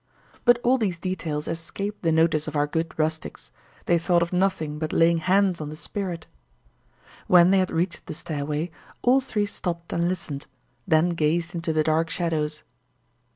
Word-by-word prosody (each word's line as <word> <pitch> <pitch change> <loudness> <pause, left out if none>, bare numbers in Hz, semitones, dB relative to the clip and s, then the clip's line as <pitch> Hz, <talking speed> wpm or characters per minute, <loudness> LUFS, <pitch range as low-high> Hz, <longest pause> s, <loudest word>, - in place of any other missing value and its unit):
But 240 0 +6
all 255 +2 +3
these 195 -6 -1
details 165 -4 -3
escaped 195 +5 -4
the 165 - +2
notice 160 -1 +2
of 155 - -5
our 145 0 +3
good 160 +2 -2
rustics; 160 0 -3 0.3
they 170 -1 +3
thought 170 0 +3
of 170 - -5
nothing 180 -5 0
but 155 -1 -2
laying 165 0 +4
hands 185 -1 +2
on 150 - -4
the 155 - -7
spirit. 175 0 -5 1.0
When 180 0 +6
they 195 - +5
had 185 - +1
reached 170 0 -2
the - - -5
stairway, 150 +2 -3 0.3
all 260 +2 +5
three 215 -6 -1
stopped 170 -4 -5
and 170 +1 +1
listened, 155 -6 -4 0.4
then 160 0 +4
gazed 165 +1 0
into 170 -1 -2
the 155 0 +2
dark 160 +1 +1
shadows. 155 -4 -1
170 Hz, 170 wpm, -25 LUFS, 155-185 Hz, 1.0 s, But